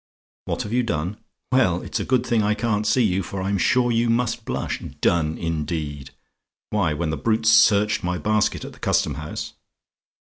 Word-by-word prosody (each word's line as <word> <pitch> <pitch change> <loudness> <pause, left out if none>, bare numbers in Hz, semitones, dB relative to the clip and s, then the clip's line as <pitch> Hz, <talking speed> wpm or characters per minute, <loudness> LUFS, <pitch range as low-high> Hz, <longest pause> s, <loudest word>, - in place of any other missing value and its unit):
"WHAT - - -2
HAVE 105 - -6
YOU 125 - +3
DONE? 95 -3 -2 0.3
"Well, 95 -10 +2
it's - - -3
a - - -1
good 130 -2 +1
thing 115 -2 +2
I 105 +1 +1
can't 105 -1 -1
see 120 +4 +3
you, 95 -3 +1
for 95 +1 -5
I'm 100 +1 0
sure 125 +5 +3
you 115 0 +1
must 120 0 0
blush. - - -3 0.2
Done, 80 -2 +1
indeed! 75 -4 -3 0.6
"Why, 100 -7 +1
when 80 0 -2
the 80 - -2
brutes 110 +7 +2
searched 105 -1 +4
my 90 0 -1
basket 105 +2 0
at - - -9
the - - -17
Custom - - +1
House! 75 +2 -6
105 Hz, 185 wpm, -23 LUFS, 85-115 Hz, 0.6 s, searched